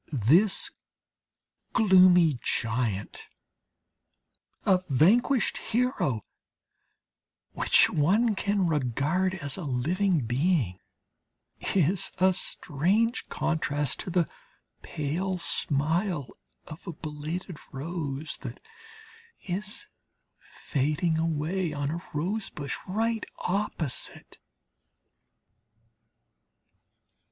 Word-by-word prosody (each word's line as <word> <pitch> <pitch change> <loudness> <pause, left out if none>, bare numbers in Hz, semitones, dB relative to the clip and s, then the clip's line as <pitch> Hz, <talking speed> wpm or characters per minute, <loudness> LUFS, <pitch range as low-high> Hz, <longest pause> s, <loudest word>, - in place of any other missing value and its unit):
This 185 - +5 1.0
gloomy 180 - +6
giant 110 -4 -2 1.4
a 190 -2 +4
vanquished 225 - +3
hero 225 - -1 1.3
which - - +5
one 205 +10 +2
can 200 -1 0
regard 155 +5 0
as 145 -6 -2
a - - -5
living 165 +6 0
being, 125 - 0 1.0
is 185 +2 +2
a 185 +1 +4
strange 190 - 0
contrast 145 -3 -1
to - - -4
the 175 -2 +1 0.5
pale 175 +6 -2
smile 160 0 +1 0.4
of 155 +5 -11
a 175 - -4
belated 155 +3 -6
rose 150 0 -4
that - - -8 0.8
is 205 - -3 0.5
fading 155 +4 -1
away 165 +2 -1
on 145 0 -2
a 170 +2 -4
rose 195 +7 -1
bush 140 -2 -4
right 225 +3 -1 0.2
opposite. 180 -7 -3
170 Hz, 80 wpm, -27 LUFS, 145-190 Hz, 1.4 s, gloomy